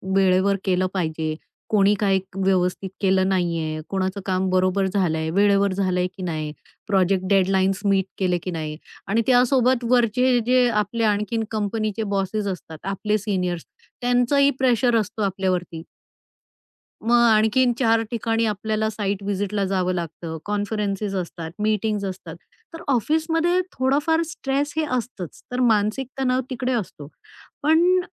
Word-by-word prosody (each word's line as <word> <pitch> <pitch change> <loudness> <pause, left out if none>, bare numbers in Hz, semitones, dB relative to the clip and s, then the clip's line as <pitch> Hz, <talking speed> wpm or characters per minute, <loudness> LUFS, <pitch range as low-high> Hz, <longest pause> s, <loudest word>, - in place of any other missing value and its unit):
वेळेवर 195 +1 +3
केलं 185 0 +2
पाहिजे. 160 -3 -2 0.3
कोणी 205 -1 +4
काही 195 -2 +2 0.2
व्यवस्थित 190 0 0
केलं 190 -1 +2
नाहीये, 165 -4 -1
कोणाचं 190 +1 -2
काम 185 0 0
बरोबर 185 +1 +2
झालंय, 165 -5 0
वेळेवर 200 +1 +3
झालंय 185 -2 0
की 185 - -6
नाही, 155 -3 -3 0.4
प्रोजेक्ट 190 -2 +2
डेडलाईन्स 190 -1 +2
मीट 195 -2 +3
केले 180 -2 +1
की 185 - -3
नाही 155 -2 -4 0.3
आणि 225 +4 +2
त्यासोबत 250 0 +3
वरचे 250 +1 +3
जे 250 0 +4
आपले 210 +1 -1
आणखीन 215 +2 0
कंपनीचे 215 0 -2
बॉसेस 200 +2 -1
असतात, 170 -4 -6
आपले 205 +2 -1
सीनियर्स, 180 -5 -2 0.4
त्यांचंही 245 +3 +3
प्रेशर 245 -2 +3
असतो 215 +1 -4
आपल्यावरती. 185 -4 -2 1.2
मग 240 0 +5
आणखीन 240 +4 +3
4 230 -3 +3
ठिकाणी 225 -1 0
आपल्याला 215 +1 -1
साईट 205 -2 -3
व्हिजिटला 200 0 -1
जावं 185 -1 0
लागतं, 165 -1 -5
कॉन्फरन्सेस 205 -1 -2
असतात, 170 -2 -5
मीटिंग्ज 210 -1 0
असतात, 190 -1 -7 0.4
तर 330 - -8
ऑफिसमध्ये 320 - +1
थोडाफार 295 +5 +1
स्ट्रेस 285 -1 -2
हे 315 - +2
असतंच. 220 -8 -7
तर 250 - -2
मानसिक 225 +2 +2
तणाव 255 -1 +1
तिकडे 255 0 -2
असतो, 180 - -4 0.6
पण 340 +4 +4
200 Hz, 130 wpm, -23 LUFS, 185-235 Hz, 1.2 s, मग